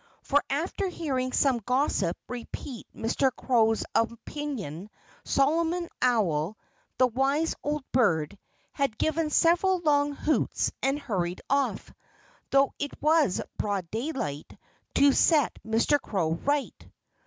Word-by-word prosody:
For 285 +1 +2
after 340 +7 -1
hearing 270 -8 -2
some 260 -2 +2
gossip 245 - 0
repeat 245 0 -7
Mr. 245 +4 0
Crow's 225 -3 +2
opinion 230 - -3 0.3
Solomon 330 +5 +1
Owl 205 -7 +1 0.4
the 255 - +5
wise 270 +6 +1
old 295 -1 -2
bird 165 - +2 0.4
had 275 -6 -1
given 315 0 0
several 350 +4 +3
long 290 -4 +2
hoots 305 +2 0
and 270 +1 +1
hurried 190 -11 -3
off, 280 0 0 0.6
though 275 0 +3
it 285 - -4
was 305 - +3 0.2
broad 195 -5 -2
daylight, 220 - -4 0.4
to 280 0 +5
set 300 -4 +3
Mr. 230 +6 +2
Crow 170 -6 -1
right. 280 - -1
270 Hz, 115 wpm, -27 LUFS, 220-295 Hz, 0.6 s, the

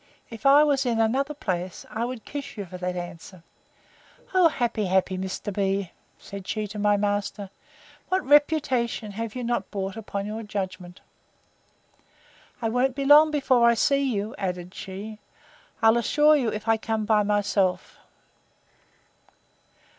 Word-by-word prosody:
If 230 +4 -2
I 285 +2 +7
was 280 -2 +2
in 235 -3 0
another 270 +7 +1
place, 185 -8 -4
I 225 +2 -2
would 245 -2 -6
kiss 280 -2 -7
you 200 - -4
for 180 0 -10
that 180 0 -3
answer. 175 0 -8 0.9
Oh! 370 -2 +6
happy, 235 -6 -1
happy 190 0 +1
Mr. 190 +2 -4
B——! 195 -1 -1 0.3
said 200 -1 -10
she 215 -1 -2
to 210 +1 -7
my 205 0 +3
master; 205 -1 -2 0.6
what 375 0 0
reputation 275 -6 +2
have 225 +2 -5
you 250 - -4
not 240 0 -2
brought 195 -2 -4
upon 200 -3 -5
your 215 +2 -5
judgment! 185 -4 -6 1.6
I - - +2
won't 250 +3 +1
be 275 0 -2
long 300 +2 +7
before 265 -5 +2
I 235 - +3
see 275 +4 +2
you, 210 0 -3
added 180 -1 -4
she, 205 +3 -8 0.6
I'll 225 +1 +6
assure 295 +6 +4
you, 255 -6 +1
if 215 +1 -5
I 225 0 +4
come 220 -1 -2
by 215 -1 +3
myself. 205 -2 0
215 Hz, 150 wpm, -25 LUFS, 195-255 Hz, 1.6 s, I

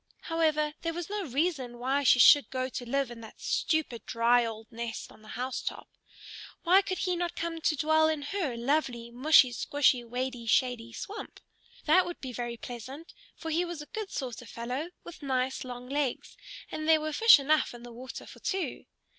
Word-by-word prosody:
However, 310 -2 +1
there 330 -1 -2
was 345 +2 -5
no 415 -2 -2
reason 270 -3 -1
why 265 +4 0
she 260 - +5
should 285 +3 +7
go 255 0 -2
to 245 -1 -6
live 275 -1 0
in 235 -1 -9
that 220 - -12
stupid, 315 -8 -1
dry, 235 +1 +3
old 225 -1 -5
nest 230 0 -5
on - - -17
the 215 - -16
house 255 +1 -3
top. - - -5 0.8
Why 370 +2 +6
could 380 -2 -3
he 365 -2 0
not 350 0 -2
come 330 -1 -3
to 315 -1 +2
dwell 315 +2 +3
in 310 -2 -1
her 290 -6 -2
lovely, 240 -2 -1
mushy 260 +1 +5
squshy, 255 +1 +2
wady 245 0 -4
shady 240 -1 +1
swamp? 410 - -7 0.5
That 350 +4 +5
would 350 - -6
be 260 -2 -6
very 240 0 -4
pleasant, 255 +8 -8 0.2
for 325 - -5
he 335 +3 +2
was 345 -2 -5
a - - -19
good 430 -3 -4
sort 250 -4 -5
of 240 - -12
fellow 250 +8 -4
with 345 - -11
nice 260 -2 -1
long 250 -1 -8
legs; 280 -2 -2 0.4
and 310 +1 -3
there 320 -1 +6
were 310 0 -3
fish 455 +9 +8
enough 300 +2 +2
in 240 - -11
the 240 -1 -10
water 255 +2 -8
for - - -13
two. 380 -2 -3
275 Hz, 195 wpm, -29 LUFS, 245-320 Hz, 0.8 s, fish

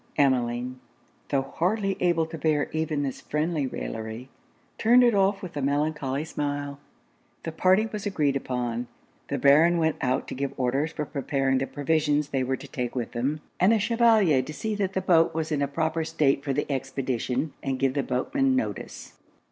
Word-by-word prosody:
Emmeline, 125 -2 +1 0.5
tho' 135 -2 +1
hardly 195 +7 -1
able 170 -2 +2
to 160 +1 -8
bear 155 -2 0
even 155 -2 -1
this 135 -2 -4
friendly 150 -1 -1
raillery, 110 +1 -6 0.5
turned 245 +3 +6
it 240 -1 +4
off 195 0 +2
with 180 - -7
a 145 - -2
melancholy 145 0 -1
smile. 145 -2 -3 0.6
The 165 - -4
party 185 +6 +3
was 210 -2 -5
agreed 150 -8 +1
upon; 125 -3 -2 0.4
the - - -2
Baron 155 +5 +5
went 160 -1 +1
out 130 -1 0
to - - -4
give 140 +1 -3
orders 135 +5 0
for 150 - -4
preparing 135 -2 0
the 135 - -2
provisions 150 0 0
they 135 -2 0
were 130 +1 -1
to 140 - -11
take 125 -2 -4
with 120 -2 -3
them, 135 +6 -2 0.2
and 190 +5 +5
the 225 - +3
Chevalier 220 - +4
to 150 +4 -7
see 220 +6 -3
that 195 -2 -1
the 190 - 0
boat 165 -3 +3
was 160 0 -2
in 145 -2 0
a 140 - +1
proper 160 +3 -1
state 150 -4 +1
for 140 - -1
the 145 +2 0
expedition 135 0 -2
and 135 -1 -2
give 135 0 +1
the 140 - +1
boatmen 260 - 0
notice. 260 - -4
145 Hz, 185 wpm, -26 LUFS, 135-165 Hz, 0.6 s, turned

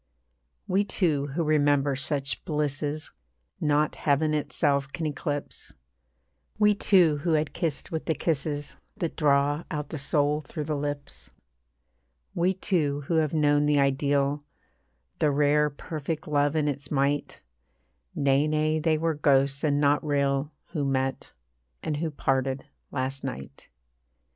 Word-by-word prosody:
We 195 +1 +2
two 155 -8 0
who 170 - +1
remember 145 -2 +2
such 140 0 -2
blisses 150 -1 -2 0.5
Not 150 0 +2
heaven 155 +2 +1
itself 140 -2 0
can 165 - -4
eclipse, 145 -1 -4 0.8
We 210 0 +5
two 180 -6 +4
who 165 +3 0
had 155 -1 0
kissed 160 -5 -2
with 160 -1 -3
the 160 - +1
kisses 145 -1 -2 0.2
That 170 -6 -3
draw 145 +1 +2
out 150 -2 -4
the 160 - -5
soul 145 +2 +1
through 150 +1 -6
the 150 +1 -2
lips, 145 0 -5 1.0
We 175 +2 +2
two 155 -7 0
who 160 +4 -1
have 155 -1 +1
known 145 -1 +3
the 145 -1 +3
ideal, 140 +1 +1 0.8
The 150 - +3
rare 150 +1 +3
perfect 155 +1 -5
love 145 0 +1
in 150 -1 +1
its 140 0 -3
might 140 0 0 0.7
Nay, 140 +1 +3
nay, 155 +1 +1
they 155 0 +2
were 165 +1 0
ghosts, 140 -1 +2
and 145 -2 +2
not 145 0 +3
real, 140 -1 0 0.2
Who 155 -4 -2
met, 135 -1 -1 0.5
and 150 - -2
who 160 +2 -1
parted, 135 -2 -1 0.2
last 135 0 -3
night. 70 +2 -7
145 Hz, 140 wpm, -27 LUFS, 140-155 Hz, 1.0 s, We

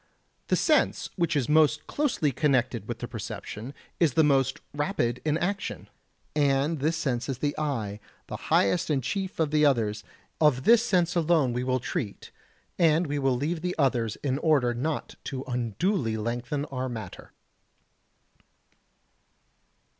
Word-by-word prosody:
The - - +3
sense - - +2
which 170 -4 0
is 135 -5 +1
most 155 -1 +3
closely 255 - 0
connected 130 -5 +1
with - - -4
the - - -5
perception 110 +6 -6 0.3
is 160 -7 +3
the 160 - +5
most 135 -3 +2
rapid 145 - -1
in 155 0 +1
action, 190 +3 -3 0.5
and 145 +1 +2
this 155 +4 0
sense 125 -5 -2
is 135 - -2
the 145 +2 -1
eye, 115 -9 -2 0.3
the - - -6
highest 130 - +3
and 140 -4 +1
chief 190 - -3
of 155 -2 +1
the 150 0 +3
others; 110 -7 +2 0.4
of 145 -5 +3
this 230 +5 +6
sense 180 -7 +1
alone 160 -6 +2
we 125 +1 -1
will 130 0 +1
treat, 125 - -5 0.5
and 165 0 +4
we 145 -1 -2
will 135 -2 +2
leave 160 +5 -2
the 180 0 -2
others 125 -7 +1
in 135 -1 0
order 140 -7 +3
not 145 +6 -3
to 130 -2 -4
unduly 125 - -1
lengthen 120 +6 -2
our 130 -2 -4
matter. 110 -6 -8
140 Hz, 150 wpm, -27 LUFS, 125-160 Hz, 0.5 s, this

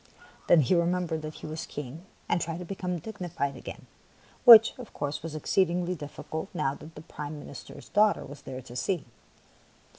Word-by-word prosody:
Then 165 - +7
he 135 - +2
remembered 170 -2 +1
that 155 0 -6
he - - -9
was 155 +1 -5
a - - -20
king, 145 +6 -7 0.2
and 175 - +1
tried 165 0 -3
to 180 - -6
become 180 -1 -3
digni 185 0 -6
fied 140 -4 -2
again, - - -9 0.6
which, 225 -2 +11
of 245 - -10
course, 145 0 -3
was 160 -1 -6
exceedingly 175 +3 +1
difficult 155 0 -6
now 135 -3 +1
that 155 +3 -12
the 150 - -9
Prime 150 -2 -7
Minister's 145 -1 -10
daugh 210 0 +5
ter - - -8
was 145 0 -10
there 130 -1 -7
to 120 -1 -11
see. 170 +7 -1
160 Hz, 190 wpm, -28 LUFS, 145-180 Hz, 0.6 s, which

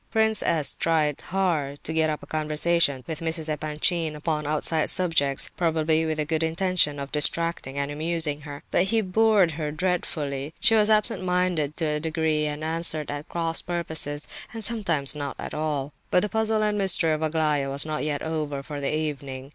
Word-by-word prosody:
Prince 220 -1 +5
S. 160 -4 +1
tried 155 -3 0
hard 165 -7 -2
to 160 - -2
get 160 -1 +2
up 150 - -4
a - - -9
conversation 155 -2 +1
with 155 +2 -5
Mrs. 160 -1 -1
Epanchin 155 +1 0
upon 150 -1 -2
outside 155 +1 +4
subjects, 145 -7 +3
probably 160 -1 +1
with 155 -1 -2
the 155 - -1
good 160 +1 -1
intention 165 -2 +1
of 140 0 -6
distracting 150 -2 -1
and 140 0 -2
amusing 155 -1 -2
her; 145 0 -9
but 180 - +2
he 225 +3 +1
bored 205 -2 +3
her 155 -1 -4
dreadfully. 150 -4 -3
She - - +3
was 215 -1 +4
absent 215 +1 +2
minded 180 -5 -1
to 165 - -1
a 150 -1 -1
degree, 160 -1 -1
and 150 +1 -5
answered 160 -2 +1
at 145 +1 -7
cross 165 -1 -1
purposes, 160 -4 -1 0.3
and 225 -1 0
sometimes 175 -12 +2
not 145 -2 -5
at - - -7
all. 150 -2 -3 0.2
But 180 - +3
the 210 - -2
puzzle 220 +1 0
and 210 -1 0
mystery 180 -4 +1
of 155 0 -1
Aglaya 155 -3 0
was 140 +2 +1
not 155 -1 -3
yet 145 -1 -2
over 150 -3 -3
for 145 0 -7
the 140 - -1
evening. 140 -3 -4
155 Hz, 185 wpm, -25 LUFS, 150-170 Hz, 0.3 s, Prince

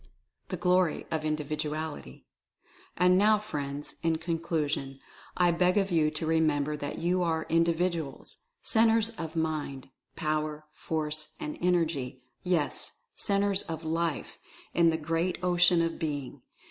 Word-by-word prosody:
THE - - -3
GLORY 180 -2 +2
OF 160 -1 -1
INDIVIDUALITY. 155 - -3 0.7
And 180 +1 +5
now, 215 +1 +5
friends, 145 -9 -5
in 165 -1 +2
conclusion 160 -5 -2 0.4
I 175 -1 +4
beg 180 +3 +2
of 195 -1 +1
you 160 -3 +3
to 155 +1 -4
re 160 0 +2
member 150 -1 +1
that 145 -1 -5
you 180 +2 +1
are 165 -2 0
Individuals 165 -2 0
— 485 - -41
Centres 225 -1 +5
of 160 0 -5
Mind, 155 -5 -2 0.3
Power, 155 -1 -2
Force 155 -1 0
and 150 - -4
Energy, 160 -8 0 0.2
yes, 175 - -1
Centres 200 -1 +1
of 160 0 -6
LIFE, 165 -1 -2 0.3
in 170 -1 +5
the 160 - +1
great 165 +3 -1
Ocean 175 -1 +4
of 165 0 -2
Being. 145 -4 -4
160 Hz, 135 wpm, -29 LUFS, 150-180 Hz, 0.7 s, And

